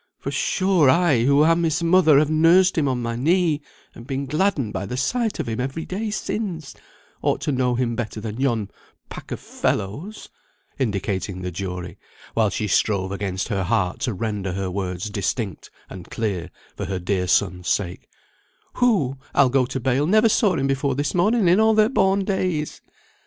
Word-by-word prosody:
For - - -5
sure, 185 -7 +2
I, 150 -7 +3
who 140 +2 +5
am 165 +1 +3
his 165 +1 0
mother, 170 -2 +5
and 140 - +6
have 150 - 0
nursed 170 +4 +5
him 155 -3 +1
on 125 -2 -1
my 115 0 -2
knee, 160 +3 +1 0.3
and 115 - -12
been 135 0 -3
gladdened 150 - 0
by 95 +1 -3
the 125 - -4
sight 225 - -1
of 155 - -2
him 115 0 -3
every 135 +6 -3
day 215 +4 -3
since, 185 - -4 0.5
ought - - +1
to - - -1
know 125 -2 +1
him 120 -1 -1
better 110 -2 -4
than 110 +3 -5
yon 115 -7 0 0.4
pack - - -9
of - - -3
fellows" 150 - -3 0.5
(indicating 100 -5 -2
the 90 - -3
jury, 90 -1 -6 0.3
while 110 -2 +2
she 105 - -2
strove 100 -2 +1
against 95 -2 -3
her 100 -2 -1
heart 95 -3 0
to 120 - -1
render 100 -3 -3
her 95 -1 -3
words 90 0 -3
distinct 100 -1 -3 0.2
and 90 -2 -10
clear 95 -6 -3 0.3
for - - -4
her 95 - -2
dear 90 0 -1
son's 90 -2 +1
sake) 90 -3 -2 0.7
"who, 160 - +2 0.2
I'll 130 - +5
go 130 -1 +2
bail, 130 +2 0
never 215 +4 +4
saw 210 -2 +2
him 135 - 0
before 135 0 0
this 145 +1 -1
morning 205 +3 +2
in 180 +4 +5
all 220 0 +4
their 215 0 +4
born 195 -6 +2
days. 185 -6 -2
130 Hz, 185 wpm, -22 LUFS, 100-170 Hz, 0.7 s, and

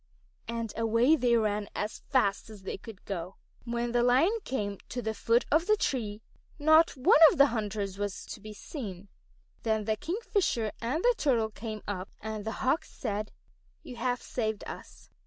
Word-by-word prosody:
And 230 -1 -3
away 230 +6 +4
they 245 -5 +3
ran 210 -2 0
as 210 +1 -3
fast 220 -7 +1
as 210 -3 -12
they 190 - -4
could 205 -1 -12
go. 185 -1 -5 0.3
When 235 0 -2
the 240 0 +2
Lion 260 - +4
came 205 -6 -3
to 250 - -4
the 220 -2 -2
foot 230 +2 +2
of 325 +4 +3
the 430 0 +4
tree, 220 - -2 0.3
not 315 0 +5
one 255 +3 +5
of - - -4
the 280 - +8
hunters 205 -3 -3
was 205 -1 -3
to - - -8
be 215 +1 -8
seen. 205 - -7 0.5
Then 220 -2 0
the 220 0 +1
Kingfisher 340 - -1
and 255 +9 -1
the - - +5
Turtle 230 -7 +2
came 215 0 -6
up, 190 -2 -4
and 215 -1 -5
the 220 - -2
Hawks 280 +5 +1
said: 210 -2 -4 0.5
"You 255 -7 -9
have 250 +1 -1
saved 220 -3 -2
us. - - -10
225 Hz, 175 wpm, -29 LUFS, 210-255 Hz, 0.5 s, the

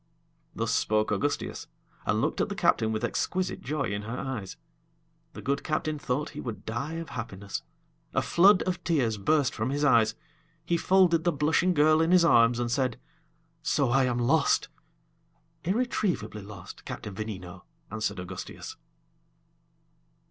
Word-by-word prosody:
Thus 115 0 -1
spoke 110 -1 +1
Augustias, 140 +8 -2 0.4
and - - +2
looked - - 0
at - - 0
the - - -4
captain 110 - +2
with 110 +1 -2
exquisite 185 +9 -1
joy 150 +1 -2
in 100 0 -2
her 115 +4 -5
eyes. 120 -9 -5 0.8
The - - -9
good 140 +1 -1
captain 155 -1 -1
thought 135 +2 -2
he - - -7
would 115 -4 -6
die 120 +8 -3
of 165 -1 -5
happiness; 100 - -5 0.5
a - - +1
flood 190 +3 +5
of 180 -1 -3
tears 125 -10 +1
burst 145 +5 +2
from 110 +2 -2
his 145 +2 -1
eyes; 115 -5 +4 0.5
he 170 - +1
folded 170 -1 +4
the 175 - +3
blushing 160 +4 +2
girl 155 +2 +5
in 165 - +2
his 180 -1 +6
arms, 115 -6 +5
and 120 -1 -1
said: 130 -2 0 0.6
"So 140 -4 +1
I 135 +1 +4
am 125 -1 0
lost?" 140 +5 +2 1.0
"Irretrievably 190 - -1
lost, 100 -2 -11
Captain 105 - -6
Veneno," 95 -4 -7 0.3
answered 105 -2 -2
Augustias. 90 0 -7
130 Hz, 150 wpm, -28 LUFS, 110-160 Hz, 1.0 s, his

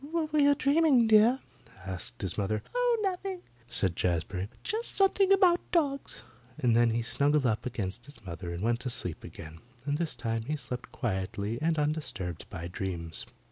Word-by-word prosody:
"What 320 -2 -1
were 305 - +4
you 285 0 +6
dreaming, 280 -3 +4
dear?" 220 +4 +5 0.4
asked 95 0 -5
his 95 -3 -1
mother. 105 +1 -1
"Oh, - - +3
nothing," 375 -1 -2 0.3
said 95 -6 0
Jazbury. 90 +3 -1
"Just 450 +2 -2
something 390 0 +4
about 370 -3 +6
dogs"; 285 -5 0 0.3
and 120 -3 +2
then 120 0 +5
he 115 +1 0
snuggled 145 +4 +2
up 115 0 +1
against 110 -1 -4
his 145 -7 -14
mother 85 0 -6
and 85 +3 -4
went 115 +1 +2
to 125 - -4
sleep 90 -8 -4
again, 80 +1 -10 0.3
and 145 +1 0
this 165 -5 -1
time 115 -1 -2
he 155 - 0
slept 125 -4 -6
quietly 100 0 -2
and 160 0 +1
undisturbed 145 - -2
by 85 -3 -5
dreams. 85 -3 -4
125 Hz, 175 wpm, -30 LUFS, -, 0.4 s, you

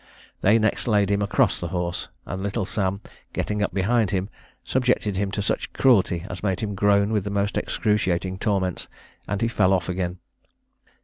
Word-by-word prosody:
They 105 +4 +5
next 110 +1 0
laid 105 -3 +3
him 100 0 +2
across 100 -1 +2
the 85 - -3
horse, 90 -1 -3 0.2
and 95 +1 -5
little 100 +1 -1
Sam, 100 0 -1 0.3
getting 105 0 -2
up 105 - 0
behind 105 +2 +2
him, 95 0 -1 0.3
subjected 125 -5 +1
him 100 +1 0
to 105 - -1
such - - -2
cruelty 95 -9 +3
as 90 - -6
made 95 -3 -1
him 105 -2 -2
groan 100 +1 +3
with 105 -3 +1
the 100 - -4
most 100 0 -1
excruciating 95 -4 0
torments, 95 -5 -1 0.4
and 100 +2 -1
he - - +3
fell 105 -5 +2
off 90 -2 0
again. 90 0 -2
100 Hz, 180 wpm, -24 LUFS, 95-105 Hz, 0.4 s, They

